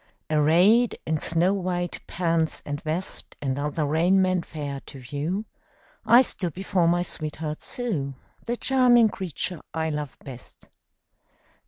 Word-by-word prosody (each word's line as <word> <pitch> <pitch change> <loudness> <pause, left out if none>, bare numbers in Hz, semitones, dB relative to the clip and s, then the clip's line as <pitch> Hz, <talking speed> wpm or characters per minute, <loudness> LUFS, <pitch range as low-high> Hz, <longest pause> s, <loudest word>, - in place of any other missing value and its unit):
Arrayed 175 +11 +4
in 155 -1 0
snow 170 +5 +2
white 180 -2 -2
pants 165 -2 0
and 145 0 -4
vest, 160 +4 -4
And 135 -1 -2
other 150 +1 -1
raiment 180 +4 +2
fair 145 -3 -5
to 140 - -10
view, 145 - -3 0.6
I 245 +2 +8
stood 180 - -4
before 185 -2 +1
my 175 +1 +3
sweetheart 155 -2 -5
Sue 160 - -3 0.3
The 240 +1 -1
charming 245 -4 +5
creature 180 -3 -4
I 160 0 0
love 150 -2 -4
best. 130 -3 -11
165 Hz, 130 wpm, -25 LUFS, 150-190 Hz, 0.6 s, I